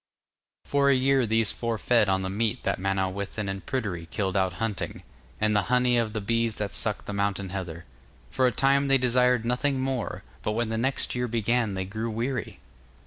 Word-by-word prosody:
For 140 Hz, -1 st, +3 dB
a 140 Hz, -, +5 dB
year 130 Hz, -1 st, +3 dB
these 110 Hz, -1 st, +3 dB
four 115 Hz, -1 st, -2 dB
fed 115 Hz, -2 st, +3 dB
on 95 Hz, 0 st, +1 dB
the 95 Hz, -, -2 dB
meat 115 Hz, +4 st, -1 dB
that -, -, 0 dB
Manawyddan 95 Hz, +2 st, -2 dB
and 95 Hz, 0 st, -4 dB
Pryderi 100 Hz, -11 st, -3 dB
killed 95 Hz, 0 st, -2 dB
out 95 Hz, -2 st, +2 dB
hunting, 105 Hz, +2 st, -4 dB, 0.4 s
and 110 Hz, 0 st, +2 dB
the 105 Hz, -, +4 dB
honey 125 Hz, 0 st, +3 dB
of 115 Hz, -2 st, 0 dB
the 110 Hz, -, -2 dB
bees 115 Hz, +1 st, 0 dB
that 105 Hz, -1 st, -3 dB
sucked 105 Hz, -2 st, -2 dB
the 105 Hz, -, -5 dB
mountain 100 Hz, -1 st, -1 dB
heather. 90 Hz, -3 st, -5 dB, 0.4 s
For 130 Hz, -, +2 dB
a -, -, +2 dB
time 140 Hz, +3 st, +3 dB
they 135 Hz, 0 st, +5 dB
desired 125 Hz, -1 st, +3 dB
nothing 130 Hz, +3 st, 0 dB
more, 130 Hz, -3 st, -2 dB, 0.2 s
but 105 Hz, -, -1 dB
when 115 Hz, 0 st, 0 dB
the 110 Hz, -, -1 dB
next 130 Hz, +3 st, 0 dB
year 125 Hz, 0 st, -1 dB
began 115 Hz, -2 st, 0 dB
they 95 Hz, 0 st, -2 dB
grew 110 Hz, +4 st, -4 dB
weary. 120 Hz, +1 st, -3 dB
115 Hz, 195 wpm, -27 LUFS, 100-125 Hz, 0.4 s, a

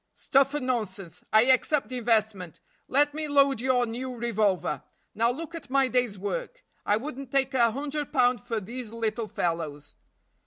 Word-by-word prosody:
"Stuff 275 Hz, +1 st, +2 dB
and 295 Hz, -, -2 dB
nonsense 200 Hz, -8 st, -3 dB
I 220 Hz, +1 st, +6 dB
accept 260 Hz, 0 st, +2 dB
the 255 Hz, -1 st, -3 dB
investment. 215 Hz, -7 st, 0 dB, 0.3 s
Let 290 Hz, +2 st, +3 dB
me 310 Hz, 0 st, -2 dB
load 280 Hz, -4 st, +3 dB
your 250 Hz, -1 st, +2 dB
new 250 Hz, +2 st, -5 dB
revolver. 205 Hz, -, 0 dB, 0.3 s
Now 230 Hz, +2 st, +2 dB
look 320 Hz, +7 st, -5 dB
at 325 Hz, -5 st, -8 dB
my 270 Hz, -1 st, +3 dB
day's 245 Hz, -5 st, 0 dB
work. -, -, -4 dB, 0.2 s
I 205 Hz, -, +4 dB
wouldn't 270 Hz, +1 st, -7 dB
take 270 Hz, -1 st, +1 dB
a 235 Hz, -3 st, +4 dB
hundred 290 Hz, +4 st, -4 dB
pound 250 Hz, -3 st, +3 dB
for 235 Hz, -2 st, -3 dB
these 230 Hz, +2 st, -6 dB
little 225 Hz, -1 st, -2 dB
fellows." 165 Hz, -8 st, -3 dB
245 Hz, 165 wpm, -27 LUFS, 215-275 Hz, 0.3 s, I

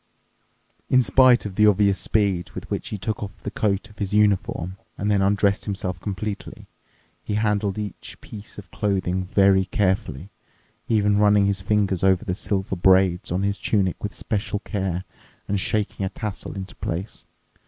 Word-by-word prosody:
In 130 Hz, -1 st, +5 dB
spite 125 Hz, 0 st, +5 dB
of 100 Hz, -, -4 dB
the 105 Hz, +2 st, +4 dB
obvious 100 Hz, -2 st, +3 dB
speed 95 Hz, -6 st, 0 dB
with -, -, -8 dB
which -, -, -2 dB
he 105 Hz, -, -4 dB
took 105 Hz, +3 st, -3 dB
off 100 Hz, -3 st, -7 dB
the 105 Hz, -, -4 dB
coat 105 Hz, -1 st, 0 dB
of 105 Hz, -, -19 dB
his 100 Hz, 0 st, -1 dB
uniform 95 Hz, -3 st, +1 dB, 0.2 s
and 105 Hz, +1 st, 0 dB
then 100 Hz, -1 st, +3 dB
undressed 100 Hz, 0 st, +2 dB
himself 95 Hz, -3 st, -3 dB
completely, 105 Hz, +2 st, -5 dB, 0.6 s
he 105 Hz, -, -3 dB
handled 105 Hz, -2 st, 0 dB
each 105 Hz, -3 st, -6 dB
piece 105 Hz, 0 st, -10 dB
of 95 Hz, -5 st, -11 dB
clothing 95 Hz, -2 st, -1 dB
very 95 Hz, 0 st, +4 dB
carefully, 95 Hz, -, -1 dB, 0.6 s
even 105 Hz, -2 st, +2 dB
running 105 Hz, -1 st, +5 dB
his 100 Hz, -1 st, 0 dB
fingers 100 Hz, -3 st, +1 dB
over 95 Hz, +2 st, +3 dB
the 90 Hz, -, -1 dB
silver 95 Hz, 0 st, -2 dB
braids 95 Hz, -1 st, +3 dB
on 90 Hz, +3 st, 0 dB
his 100 Hz, 0 st, -1 dB
tunic 95 Hz, -5 st, 0 dB
with 105 Hz, -, -4 dB
special 105 Hz, 0 st, -2 dB
care 95 Hz, -4 st, -2 dB, 0.4 s
and 100 Hz, 0 st, 0 dB
shaking 100 Hz, +1 st, -1 dB
a 95 Hz, -, 0 dB
tassel 105 Hz, -1 st, -6 dB
into 95 Hz, -1 st, -6 dB
place. 90 Hz, +5 st, -4 dB
100 Hz, 165 wpm, -23 LUFS, 95-105 Hz, 0.6 s, In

